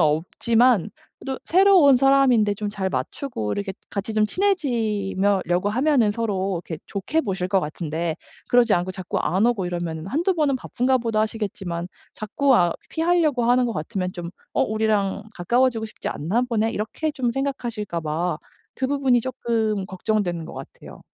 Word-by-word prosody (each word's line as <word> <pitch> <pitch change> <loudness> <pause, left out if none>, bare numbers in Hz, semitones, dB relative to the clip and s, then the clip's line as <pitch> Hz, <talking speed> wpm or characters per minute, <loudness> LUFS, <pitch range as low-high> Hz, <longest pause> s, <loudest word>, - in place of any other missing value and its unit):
없지만 210 +8 +2 0.3
그래도 265 -1 -4
새로 380 +1 +5
온 280 -2 +7
사람인데 255 -6 +4
좀 210 0 -4
잘 195 -2 -2
맞추고 190 - -3
이렇게 200 -1 -3 0.2
같이 205 +2 -3
좀 215 0 +3
친해지며 215 - 0
려고 180 +3 +1
하면은 255 -1 +3
서로 200 -5 -1
이렇게 160 -2 -6
좋게 205 +11 -1
보실 190 - -2
것 190 0 +2
같은데 160 +1 -3 0.3
그러지 245 -3 +4
않고 175 +1 -1
자꾸 185 -1 -4
안 190 +5 +2
오고 225 -7 0
이러면은 170 -2 -4
1-2 340 - +1
번은 295 -5 +1
'바쁜가 255 +1 0
보다.' 230 -2 0
하시겠지만 195 -6 -3 0.3
자꾸 270 +6 +1
아 175 -1 +3 0.2
피하려고 320 -6 +1
하는 245 +1 +4
거 235 - -2
같으면 185 +2 -3
좀 175 -1 -6 0.2
'어 - - +3
우리랑 215 -2 0
가까워지고 235 +5 +1
싶지 - - -6
않나 180 +11 -1
보네?' 225 -1 +1
이렇게 290 +9 -3
좀 250 -4 -1
생각하실까 235 -9 -3
봐 165 +3 -2 0.4
그 260 - +2
부분이 270 -3 +2
쪼끔 225 -5 -1
걱정되는 190 -3 -1
것 - - -9
같아요. - - -11
215 Hz, 355 characters per minute, -23 LUFS, 185-255 Hz, 0.4 s, 온